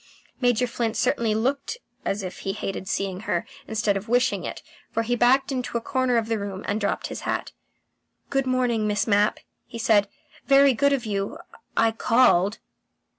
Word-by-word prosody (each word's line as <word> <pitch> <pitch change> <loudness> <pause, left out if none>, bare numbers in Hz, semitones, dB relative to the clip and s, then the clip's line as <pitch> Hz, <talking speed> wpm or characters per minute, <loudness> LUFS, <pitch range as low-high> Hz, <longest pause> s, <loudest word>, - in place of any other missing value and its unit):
Major 245 -1 +3
Flint 230 -2 -2
certainly 225 -2 +1
looked 275 - -1 0.3
as 200 0 -1
if 185 - -6
he 195 - -3
hated 195 -2 -5
seeing 195 -2 -2
her, 175 -4 -2 0.2
instead 215 -2 0
of 195 +2 -5
wishing 245 +1 +2
it, - - -6 0.3
for 230 - -1
he 245 +2 0
backed 260 +3 +3
into 250 -2 -2
a - - -1
corner 255 0 +1
of 225 - +1
the 225 -1 -1
room 200 -1 -5
and 210 +2 -1
dropped 200 - -1
his - - -5
hat. - - -2 0.8
"Good 270 -1 +1
morning, 245 -4 +1
Miss 210 -1 +1
Mapp," 205 -1 +2 0.3
he 230 - -8
said. 215 -3 +3 0.4
"Very 275 0 +6
good 280 +4 +2
of 265 -4 0
you. 200 +5 -2 0.4
I 225 - +5
I - - -3
called." 225 -4 +3
225 Hz, 180 wpm, -25 LUFS, 205-250 Hz, 0.8 s, Very